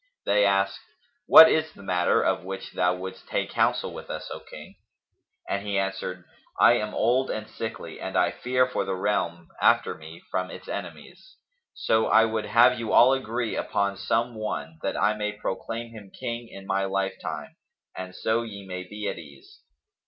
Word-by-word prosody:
They 105 0 +4
asked, 100 0 +1 0.5
"What 160 - +11
is 160 0 +1
the 100 - -14
matter 90 -2 +2
of - - 0
which 95 +1 -6
thou 90 0 +1
wouldst 95 +1 -8
take - - -2
counsel - - +1
with - - -9
us, - - -6
O - - -7
King?"; - - -12 0.7
and 100 - -1
he 100 -1 -2
answered, 95 -2 -3 0.4
"I - - +7
am 105 0 -4
old 125 +4 +2
and 110 0 -4
sickly 110 - -7
and - - -3
I - - +3
fear 125 0 +1
for 125 - -2
the 95 - -2
realm 85 -4 -1
after - - +4
me 80 +2 -12
from 90 0 -1
its - - -10
enemies; - - -8 0.4
so 110 0 +1
I 110 0 +6
would 110 -1 -2
have 120 +2 +5
you 115 -2 -3
all 130 +2 +7
agree 120 -3 -2
upon 100 0 -1
some 115 +5 0
one, 80 -8 -5
that - - -2
I 105 +1 +3
may 105 0 -3
proclaim 115 +3 -5
him 105 -4 -11
King 115 +3 -5
in 100 -3 -11
my 95 0 0
lifetime 95 0 -3 0.4
and 95 0 -7
so 110 +4 0
ye 100 -4 -8
may 90 -1 -5
be 105 +3 -6
at - - -3
ease." 70 -4 -15
100 Hz, 180 wpm, -26 LUFS, 95-115 Hz, 0.7 s, What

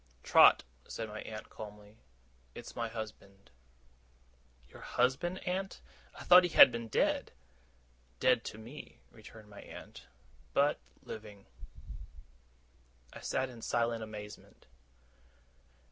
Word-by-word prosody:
'Trot,' - - +7 0.2
said 115 - -5
my 110 0 -7
aunt, 110 -1 -8
calmly, 105 0 -11 0.6
'it's - - -9
my 115 -1 -2
husband.' 110 -3 -9 1.2
'Your - - -14
husband, 135 +9 0
aunt? 190 +1 -2 0.4
I - - -8
thought 180 0 +9
he 175 - 0
had 135 - +9
been 115 -1 -5
dead!' 110 - 0 0.9
'Dead 125 -2 +3
to - - -6
me,' 120 +7 -11
returned 110 -1 -14
my 100 - -11
aunt, - - -12 0.5
'but 145 +1 +3 0.2
living.' 105 -2 -10 1.7
I - - -9
sat 130 0 -1
in 120 -2 -11
silent 115 0 0
amazement. 105 -1 -10
115 Hz, 115 wpm, -32 LUFS, 105-130 Hz, 1.7 s, thought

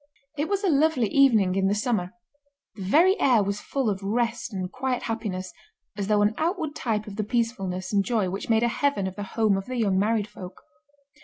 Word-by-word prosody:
It 300 +3 -2
was 400 0 -1
a - - +2
lovely 300 -6 +3
evening 225 -10 +4
in 190 0 +1
the 200 - +1
summer; 210 -4 -1 0.6
the 210 - -11
very 330 - +4
air 240 -6 +4
was 200 +1 -3
full 270 -4 -2
of 200 -2 -1
rest 230 +3 -1
and 185 -2 -4
quiet 255 +1 -2
happiness, 190 -6 -4 0.4
as 200 -1 -3
though 210 -1 +3
an 210 +1 +2
outward 320 -2 -1
type 215 -3 -2
of 205 -2 -9
the 215 - 0
peacefulness 205 -5 -2
and 200 -1 +3
joy 220 -4 0
which 195 +4 -5
made 225 0 +3
a - - +3
heaven 260 -4 0
of 190 0 -4
the 205 - -6 0.2
home 215 -3 +3
of 195 - -5
the 255 - -4
young 200 -5 +2
married 215 0 +1
folk. 185 -3 -11
220 Hz, 215 wpm, -25 LUFS, 195-250 Hz, 0.6 s, evening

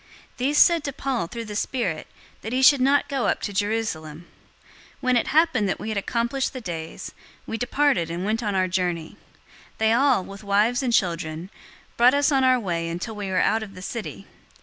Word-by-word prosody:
These 275 +4 0
said 335 -1 +5
to 280 - -3
Paul 260 -9 -2
through 230 +5 -6
the 210 -1 -7
Spirit, 205 -8 -2 0.3
that 220 - -6
he 260 +1 +1
should 280 -1 +7
not 275 +2 +3
go 270 -3 -1
up - - +1
to 205 - -3
Jerusalem. 190 -7 -2 0.7
021:005 - - -30
When 255 -2 +2
it 240 - +1
happened 295 - +2
that - - -2
we 215 - -5
had 215 - -2
accomplished 235 +5 -1
the 260 - -5
days, 165 -7 -6 0.3
we - - -4
departed 245 - +1
and 175 +3 -4
went 220 +3 0
on 205 -3 -2
our 185 -1 +2
journey. 175 -3 -2 0.6
They 220 0 +3
all, 255 -4 +3
with 200 +2 -10
wives 210 +5 +2
and 255 -3 -1
children, 170 -3 -1 0.5
brought 245 +3 +6
us 285 +1 +3
on 270 -2 +3
our 255 -1 +4
way 170 -6 -2
until 175 +7 -4
we 205 -1 -5
were 185 - +1
out 225 - +2
of 200 -3 -8
the 185 - -9
city. 230 +2 -6
220 Hz, 205 wpm, -24 LUFS, 185-255 Hz, 0.7 s, should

